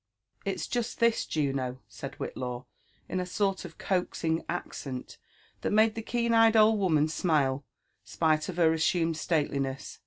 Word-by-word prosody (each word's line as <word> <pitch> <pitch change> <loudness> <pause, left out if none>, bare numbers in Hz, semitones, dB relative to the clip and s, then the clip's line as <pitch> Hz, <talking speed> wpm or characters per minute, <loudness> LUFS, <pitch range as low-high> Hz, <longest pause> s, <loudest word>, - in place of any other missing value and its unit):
'*It's - - -2
just 240 -1 -3
this, 235 -1 +2
Juno," 135 -4 -1
said - - -8
Whillaw, 125 0 -5 0.4
in 185 - -2
a 180 - -1
sort 195 0 0
of 165 - -10
coaxing 170 -3 -1
accent 135 -6 -5 0.4
that - - -1
made 215 +1 +4
the 225 - -4
keen*eyed 230 -1 +3
old 215 0 +5
woman 155 -6 +3
smile, 150 -4 +1 0.4
spite 155 -1 +1
of 180 - -5
her 165 -2 +5
assumed 165 0 +1
slateliness. 140 -4 -1
165 Hz, 145 wpm, -29 LUFS, 145-210 Hz, 0.4 s, old